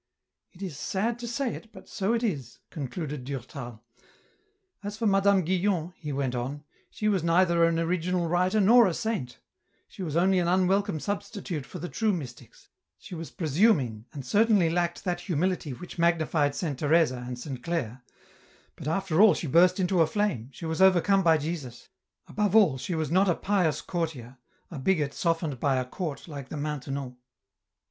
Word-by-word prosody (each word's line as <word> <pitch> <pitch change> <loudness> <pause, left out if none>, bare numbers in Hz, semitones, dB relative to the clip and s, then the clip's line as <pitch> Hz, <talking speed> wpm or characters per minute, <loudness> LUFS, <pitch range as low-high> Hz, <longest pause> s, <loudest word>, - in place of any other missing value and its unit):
" - - -58
It 185 - -9
is 160 -7 -6
sad 225 +8 -1
to 240 - -5
say 255 +1 -2
it, 225 - -10
but 190 -4 -14
so 200 +4 -1
it 235 0 0
is," 140 - -3
concluded 150 -1 -5
Durtal. 125 -3 -7 0.5
" 405 - -44
As 205 +1 -5
for 230 - -2
Madame 195 -2 +3
Guyon," 180 -1 0
he 150 -3 -6
went 135 -2 -1
on, 130 +4 -4
" - - -37
she 215 - -3
was 200 -4 +2
neither 170 0 +3
an 165 0 +1
original 175 +1 0
writer 180 +5 +2
nor 225 +3 +6
a 175 - -1
saint; 210 - -3 0.5
she - - -11
was 160 -5 -3
only 185 +2 +3
an 175 - 0
unwelcome 190 0 +2
substitute 195 - -4
for - - -8
the 175 - -5
true 220 +3 0
mystics; 135 -9 -8 0.3
she - - -12
was 165 -1 -6
presuming 150 - +1
and 140 -3 -8
certainly 205 - +3
lacked 175 0 -1
that 175 -1 -2
humility 175 -2 -1
which 175 +7 -9
magnified 160 -4 +2
Saint 150 -7 -3
Teresa 150 -5 +2
and 125 -1 -5
Saint 130 0 -6
Clare; 130 -7 -3 0.7
but - - -8
after 175 +1 +1
all 215 -1 +7
she - - -4
burst 180 +6 +4
into 180 -1 +2
a 160 - +4
flame, 195 - -1
she 165 - -9
was 160 +2 -2
overcome 190 +1 +5
by 165 -3 +4
Jesus; 145 -6 -6 0.4
above 210 -1 -1
all, 175 -12 +5
she 175 - -3
was 155 -2 -2
not 190 +2 +4
a 175 - +3
pious 180 -7 0
courtier, 140 -8 -4 0.3
a 155 - -6
bigot 150 -2 +1
softened 165 -6 -1
by 140 0 +2
a 130 -1 0
court 150 +2 -5
like 140 -4 -8
the 155 - -5
Maintenon. 140 -3 -4
170 Hz, 185 wpm, -27 LUFS, 145-190 Hz, 0.7 s, all